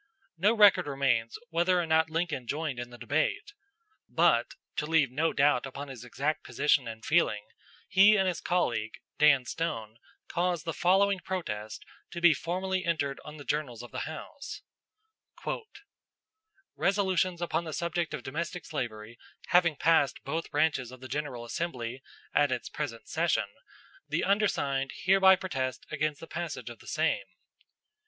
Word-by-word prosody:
No 200 +7 +3
record 200 -6 +6
remains 130 -5 0
whether 175 +2 +3
or 175 - 0
not 160 0 +3
Lincoln 160 -6 -2
joined 145 -3 -2
in 120 0 -5
the 120 - -12
debate; 410 - -1 0.6
but, - - +3 0.2
to 150 - -1
leave 160 -5 +3
no 160 +5 +1
doubt 140 0 +3
upon 140 +2 -7
his 125 -3 -8
exact 140 +5 -2
position 145 -4 +2
and 110 0 -7
feeling, 110 -11 +2 0.4
he 195 +3 +7
and 190 -1 +2
his 180 - -1
colleague, 120 -11 0 0.3
Dan 145 -4 +5
Stone, 115 -9 -4 0.3
caused 175 -2 -1
the 165 - -2
following 195 +3 +3
protest 110 - -5 0.2
to 170 - -6
be 170 -1 +6
formally 185 +4 -2
entered 145 -5 -1
on 150 0 -9
the 145 - -10
journals 125 -6 -2
of 120 - -11
the - - -3
House: 280 - -8 2.1
"Resolutions 190 -3 +1
upon 170 0 -1
the 160 - -5
subject 170 +1 -2
of - - -8
domestic 170 +5 -4
slavery 115 -5 -5 0.3
having 175 -3 +4
passed 145 -3 +2
both 160 +4 -3
branches 145 -5 +1
of 130 -1 -12
the 130 - -8
General 130 -3 -4
Assembly 125 -3 -4 0.3
at 145 -2 +3
its 125 - -2
present 125 -7 -5
session, - - +1 0.6
the 155 +3 0
undersigned 140 -10 +1
hereby 190 0 +6
protest 130 -10 -3
against 155 -1 -1
the - - -8
passage 150 -9 -5
of 120 - -12
the - - -16
same." - - 0
155 Hz, 150 wpm, -29 LUFS, 130-175 Hz, 2.1 s, he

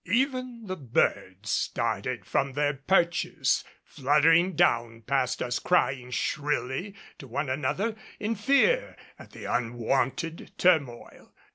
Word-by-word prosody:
Even 255 - -1
the 185 -2 -4
birds 105 - -1
started - - -1
from 135 0 0
their 145 +1 +1
perches, 170 +4 +1 0.2
fluttering 160 +6 +3
down 115 -4 +1
past 125 +1 0
us 120 -1 -2
crying 135 -8 +1
shrilly 145 +7 -2 0.2
to 135 - -10
one 140 +3 -2
another 200 +11 -1 0.2
in 215 +2 -1
fear 280 - +2 0.2
at - - -12
the - - -10
unwonted 130 +7 -1
turmoil. 140 -10 0
145 Hz, 115 wpm, -27 LUFS, 125-190 Hz, 0.2 s, fluttering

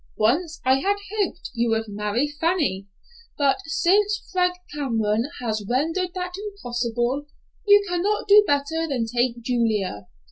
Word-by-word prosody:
Once 305 +10 +1
I 260 +1 +5
had 400 +7 +1 0.2
hoped 390 -4 -2
you 235 0 0
would 225 0 0
marry 210 +6 -1
Fanny, 290 - -1 0.5
but 280 -2 +3
since 405 +6 +1
Frank 360 -1 +2 0.2
Cameron 230 -4 0
has 220 -3 -2
rendered 330 +8 0
that 360 0 -4
impossible, 250 - -3 0.4
you 410 0 +6
cannot 360 +5 -1
do 415 +1 +8
better 290 +3 0
than 255 -6 -1
take 240 0 -1
Julia. 215 - -1
280 Hz, 135 wpm, -24 LUFS, 230-360 Hz, 0.5 s, do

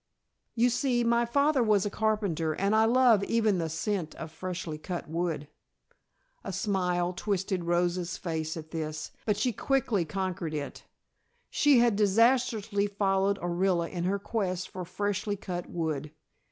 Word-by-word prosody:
"You 240 +1 +3
see, 245 -1 +1
my 235 0 +3
father 280 +3 +2
was 210 -4 +3
a 205 - -2
carpenter 200 -8 0
and 200 +6 +1
I 220 0 +5
love 235 -3 +5
even 220 -5 +2
the 165 -1 -1
scent 165 +1 -2
of 160 -1 -7
freshly 175 -3 -5
cut 175 +2 -5
wood." 160 -2 -2 1.0
A - - -4
smile 180 -3 0
twisted 190 -1 -2
Rosa's 175 0 0
face 160 -3 -3
at 160 -1 -9
this, 155 -1 -4 0.2
but 210 -2 +2
she 235 +3 +1
quickly 235 -5 +1
conquered 170 -1 -3
it. 145 -1 -6 0.7
She 290 -3 +4
had 235 -3 +3
disastrously 215 0 +2
followed 195 -1 +1
Orilla 175 -1 +1
in 175 -2 -3
her 195 +2 +1
quest 190 -3 -2
for 185 -1 -6
freshly 205 +3 -2
cut 180 -3 -5
wood. 155 -3 -3
190 Hz, 150 wpm, -29 LUFS, 170-215 Hz, 1.0 s, I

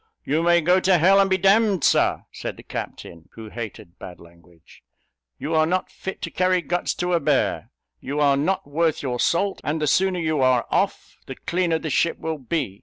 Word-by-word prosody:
"You 155 +3 0
may 170 0 +3
go 180 +4 +3
to 185 -1 +3
hell, 190 +4 +5
and 195 0 +3
be 190 - +2
d 190 +1 +1
d, 210 -4 +1
Sir!" - - +2
said - - -6
the - - -13
captain 85 -1 -8
(who 110 -1 -10
hated 105 -6 -9
bad 90 - -10
language); 85 0 -20 0.6
"you 160 - -4
are 155 0 +3
not 185 +2 -1
fit 190 - -7
to - - -4
carry 185 -1 +1
guts 175 0 -2
to 180 0 -2
a 170 - +3
bear! 145 -3 0 0.3
you 145 - -4
are 140 -2 +4
not 180 +8 -1
worth 155 +2 -1
your 125 -3 -3
salt; 195 +8 0
and 155 +2 -2
the 155 - 0
sooner 185 +4 +1
you 155 -3 0
are 130 -2 +3
off, - - -1
the - - -7
cleaner 170 -2 -1
the 160 -1 -5
ship 165 - +1
will 160 -1 -4
be! 130 - -3
160 Hz, 210 wpm, -23 LUFS, 135-180 Hz, 0.6 s, hell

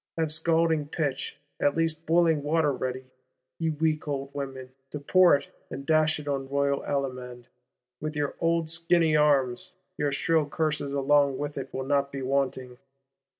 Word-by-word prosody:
Have 160 -2 0
scalding 160 -1 +1
pitch, 145 -3 -3 0.2
at 145 +2 +1
least 165 -1 -1
boiling 165 -2 +3
water 150 0 +1
ready, 130 0 -4 0.5
ye 165 - 0
weak 155 0 -1
old 140 -1 -4
women, 135 -2 -6 0.2
to 150 - -6
pour 175 +3 +5
it 140 - -5 0.2
and 140 - -7
dash 155 0 +2
it 150 - -10
on 135 -2 -2
Royal 140 0 0
Allemand, 125 -3 -4 0.5
with 155 +1 -4
your 145 -1 -1
old 165 -1 +1
skinny 165 -1 +3
arms: 140 -5 +2 0.3
your 145 -1 +1
shrill 160 +2 +1
curses 150 -2 -1
along 140 0 +2
with 145 0 -4
it 135 -1 -6
will 130 0 -4
not 140 0 +1
be 135 -1 -5
wanting! 130 -2 -2
145 Hz, 160 wpm, -27 LUFS, 135-160 Hz, 0.5 s, pour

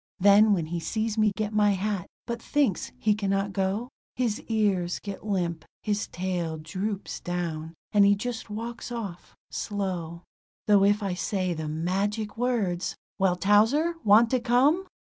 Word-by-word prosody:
Then 205 +3 +6
when 170 -5 0
he 170 +2 -3
sees 215 +6 -2
me 215 -2 +3
get 215 -1 -2
my 210 -1 +4
hat, 195 -1 -2 0.2
but 235 -1 -4
thinks 275 -11 0
he 210 +11 +2
cannot 195 -1 -1
go, 195 +6 -1 0.3
His 235 -4 -1
ears 200 -6 +1
get 200 +1 -7
limp, 175 -5 -1 0.2
his 205 -1 -1
tail 175 -3 -3
drops 190 +6 -4
down, 165 -2 -4 0.2
and 205 -2 +5
he 200 0 +6
just 230 +2 -5
walks 230 +3 -6
off 205 -7 -6 0.2
slow; 180 -5 -3 0.4
Though 205 -2 +5
if 205 +1 +3
I 195 -2 -1
say 185 0 -1
the 160 -1 -4
magic 195 +7 -1
words: 225 -8 -1 0.2
"Well, 190 -2 +3
Towser, 220 - +3
want 220 +3 +6
to 255 - +3
come?" 265 +10 +3
200 Hz, 155 wpm, -27 LUFS, 180-220 Hz, 0.4 s, Then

